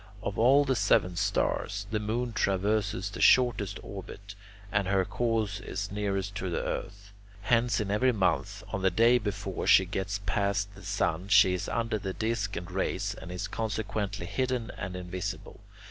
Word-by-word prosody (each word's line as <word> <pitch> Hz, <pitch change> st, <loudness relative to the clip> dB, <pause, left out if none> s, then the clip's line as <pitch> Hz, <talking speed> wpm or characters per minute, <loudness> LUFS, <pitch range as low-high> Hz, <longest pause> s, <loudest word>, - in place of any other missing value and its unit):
Of 100 Hz, -, -3 dB
all 135 Hz, +5 st, +5 dB
the 130 Hz, -1 st, +1 dB
seven 95 Hz, -4 st, +2 dB
stars, 100 Hz, +3 st, 0 dB
the 110 Hz, -, 0 dB
moon 115 Hz, +3 st, -2 dB
traverses 100 Hz, 0 st, 0 dB
the -, -, -6 dB
shortest 120 Hz, -6 st, +4 dB
orbit, 100 Hz, +1 st, -9 dB, 0.4 s
and 100 Hz, -2 st, +1 dB
her 95 Hz, -1 st, +2 dB
course 110 Hz, -3 st, -1 dB
is 100 Hz, 0 st, -5 dB
nearest 100 Hz, -1 st, -2 dB
to 95 Hz, -, -3 dB
the 85 Hz, -, -2 dB
earth. 100 Hz, 0 st, -5 dB, 0.3 s
Hence 115 Hz, +2 st, +2 dB
in 100 Hz, -2 st, -2 dB
every 125 Hz, +5 st, +3 dB
month, 95 Hz, -6 st, 0 dB
on 100 Hz, -, -3 dB
the 95 Hz, -, +4 dB
day 115 Hz, +7 st, +4 dB
before 100 Hz, -3 st, -4 dB
she 95 Hz, -, +7 dB
gets 95 Hz, +2 st, -3 dB
past 100 Hz, +1 st, 0 dB
the -, -, -13 dB
sun, 90 Hz, +4 st, -1 dB
she 95 Hz, -2 st, +6 dB
is 90 Hz, -, -3 dB
under 115 Hz, -1 st, -1 dB
his 95 Hz, -1 st, -4 dB
disc 110 Hz, -2 st, -1 dB
and 90 Hz, +1 st, -6 dB
rays, 95 Hz, +1 st, -1 dB
and 90 Hz, -2 st, -9 dB
is 90 Hz, +3 st, -4 dB
consequently 105 Hz, -3 st, -3 dB
hidden 125 Hz, +2 st, -2 dB
and 90 Hz, -1 st, -5 dB
invisible. 90 Hz, 0 st, -5 dB
100 Hz, 170 wpm, -29 LUFS, 95-110 Hz, 0.4 s, she